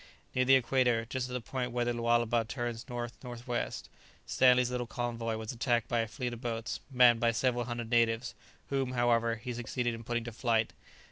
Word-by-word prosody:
Near 130 0 +2
the 135 +1 +7
equator, 125 -3 +2
just 125 +1 -3
at - - -6
the 125 - -2
point 125 +1 -3
where 120 0 0
the 120 - 0
Lualaba 120 0 +2
turns 120 +1 -5
north 120 0 -5
north 120 -1 -8
west, 120 -1 -3 0.4
Stanley's 125 -1 +4
little 125 -1 -2
convoy 115 -2 -3
was 110 -1 -5
attacked 120 -1 0
by 120 - 0
a 115 - 0
fleet 125 +2 -4
of 120 - -8
boats, 115 -2 -3
manned 125 -3 +6
by 115 0 +3
several 120 +1 0
hundred 120 -1 -5
natives, 115 0 +2 0.4
whom, 135 -2 0
however, 115 -1 +2
he 120 +2 -6
succeeded 120 0 -2
in 115 0 -7
putting 120 0 -2
to 120 - -6
flight. 115 -1 0
120 Hz, 200 wpm, -31 LUFS, 115-125 Hz, 0.4 s, the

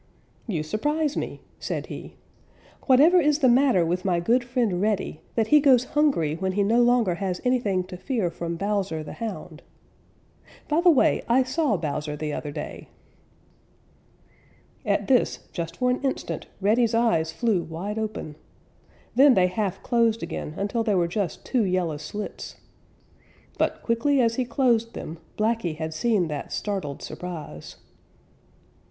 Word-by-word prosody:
"You 170 -9 -1
surprise 295 - -1
me," - - -4 0.2
said - - -3
he. - - -9 0.7
"Whatever 305 +7 +6
is 300 -1 +3
the 280 -4 +3
matter 245 -7 +4
with 180 +2 -1
my 180 -3 +1
good 235 +8 +2
friend 240 -7 0
Reddy, 210 -6 -1
that 225 -2 +1
he 300 - +7
goes 265 -4 +5
hungry 275 - +2
when 190 +1 -2
he 200 +1 +2
no 230 +4 +3
longer 240 -6 +3
has 180 0 -3
anything 220 -7 +1
to 180 0 -9
fear 210 -5 -1
from 170 0 -4
Bowser 195 -4 -2
the - - -8
Hound. 225 -4 -6 1.1
By 310 +2 +2
the 355 - +6
way, 300 -6 +4
I 255 +3 +5
saw 255 - 0
Bowser 150 -1 -3
the 150 0 -4
other 150 - -4
day." 145 - -7 2.0
At - - +1
this, - - +1
just 170 0 -5
for 250 0 +2
an 250 - -1
instant, 270 -1 -3
Reddy's 225 +3 +3
eyes 170 -9 +2
flew 205 +1 +1
wide 185 +7 -5
open. 215 -8 -5 0.8
Then 270 0 +6
they 185 - +5
half 195 +1 -2
closed 230 -2 +2
again 150 - -5
until 205 +4 -1
they 215 -3 +1
were 175 -2 +2
just 180 -1 -3
two 250 -4 +1
yellow 180 -5 0
slits. 180 +8 -7 1.0
But - - 0
quickly 245 +5 +2
as 230 -2 +3
he 255 +2 -1
closed 235 -2 +1
them, 160 +1 -7 0.2
Blacky 215 -6 0
had 160 0 -4
seen 200 +1 +1
that 145 -2 -5
startled 190 -9 -3
surprise. 160 - -7
210 Hz, 155 wpm, -25 LUFS, 175-245 Hz, 2.0 s, he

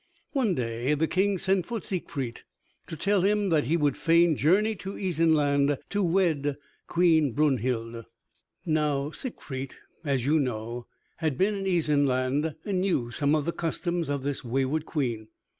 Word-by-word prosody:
One 240 - +1
day 120 +3 -1
the 155 +2 +1
King 190 +4 +1
sent 190 -1 +1
for 235 -1 -3
Siegfried 140 - -4 0.5
to 160 - -6
tell 200 +4 +2
him 205 +1 +2
that 155 -3 +2
he 165 - +2
would 145 -4 +1
fain 165 0 +4
journey 195 +11 +3
to 190 +2 -6
Isenland 150 -6 +2
to 205 - 0
wed 165 -6 +1 0.3
Queen 160 -6 +3
Brunhild. 120 -5 0 0.6
Now 150 -3 0
Siegfried, 135 - -6 0.3
as 135 -5 0
you 155 +3 +3
know, 120 -2 -3 0.3
had 155 -5 -1
been 200 +3 +2
in 195 -1 -4
Isenland 145 -3 +1
and 190 -3 0
knew 140 -11 0
some 140 +5 +2
of 150 -2 0
the 170 - 0
customs 170 0 -2
of 140 -2 -2
this 140 0 -3
wayward 135 +5 -1
Queen. 120 -8 -2
150 Hz, 155 wpm, -27 LUFS, 135-180 Hz, 0.6 s, fain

